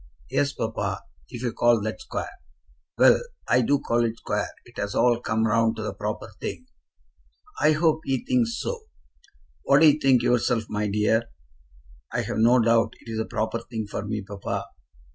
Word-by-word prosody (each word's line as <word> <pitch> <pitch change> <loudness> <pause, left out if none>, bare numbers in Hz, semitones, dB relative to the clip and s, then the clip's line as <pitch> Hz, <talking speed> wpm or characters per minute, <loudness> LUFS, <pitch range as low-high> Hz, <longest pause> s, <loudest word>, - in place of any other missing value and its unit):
"Yes, 140 0 +1
papa; - - -3 0.3
if 120 - -7
you 120 - -1
call 120 -1 +4
that 110 - -4
square." - - -5 0.7
"Well; - - +6 0.3
I 125 - +4
do 140 +4 +3
call 120 -3 0
it 115 -1 -1
square. - - -2 0.2
It - - -12
has 100 0 -3
all 120 -1 +3
come 110 -1 0
round 115 +1 +2
to 110 - -5
the 105 - -3
proper 105 +2 -4
thing." 255 - -5 0.9
"I 155 - +4
hope 155 0 +2
he 135 - -1
thinks 245 -3 +1
so." 470 -2 -4 0.8
"What 140 +2 +4
do 160 - +8
you 150 - -3
think 135 -4 +4
yourself, 120 -1 +2
my 105 0 -1
dear?" 105 +3 +2 0.9
"I've - - -2
no 120 +3 +5
doubt 115 0 +3
it's 110 -1 -5
the 110 - -1
proper 110 +2 -2
thing 115 -2 -5
for 100 0 -5
me, 105 0 -3
papa." 100 0 -4
115 Hz, 175 wpm, -25 LUFS, 110-135 Hz, 0.9 s, do